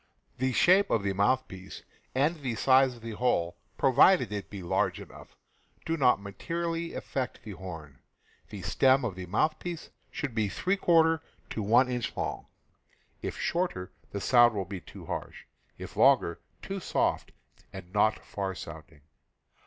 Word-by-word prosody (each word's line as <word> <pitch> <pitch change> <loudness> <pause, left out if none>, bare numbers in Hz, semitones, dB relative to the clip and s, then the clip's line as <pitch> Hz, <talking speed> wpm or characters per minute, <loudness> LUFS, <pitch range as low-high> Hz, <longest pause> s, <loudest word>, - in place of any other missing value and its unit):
The 130 0 +1
shape 185 +10 +4
of 105 - +1
the 100 -1 0
mouthpiece 95 -2 -1 0.3
and 150 +6 +2
the 130 -6 -3
size 130 +2 +4
of 115 - -16
the 115 - -5
hole 105 -7 0
— - - -40
pro 135 - +2
vided 130 - +5
it 100 -2 -5
be 100 -3 -7
large 85 - 0
enough - - -13 0.2
— - - -35
do 165 - 0
not 130 -8 +4
materially 165 +11 -4
affect 130 -2 -4
the 110 - -8
horn. 80 -7 -9 0.5
The - - -8
stem 135 0 +3
of 110 - -2
the 90 0 -8
mouthpiece 155 - -2 0.2
should 145 -6 -4
be 110 -2 +1
f - - -8
to 165 -4 +4 0.4
1 120 +5 +4
inch 125 -1 -3
long. - - -3 0.7
If - - -4
shorter, 170 - -2 0.2
the 100 - -4
sound 120 +1 +5
will 95 -2 -2
be 95 -1 -7
too - - -12
harsh; - - -6 0.3
if - - -9
longer, 85 - +4 0.2
too 195 0 -4
soft - - -1 0.4
and 90 +2 -10
not 110 +1 +2
far 95 -2 -4
sounding. 80 -4 -10
120 Hz, 160 wpm, -29 LUFS, 100-155 Hz, 0.7 s, vided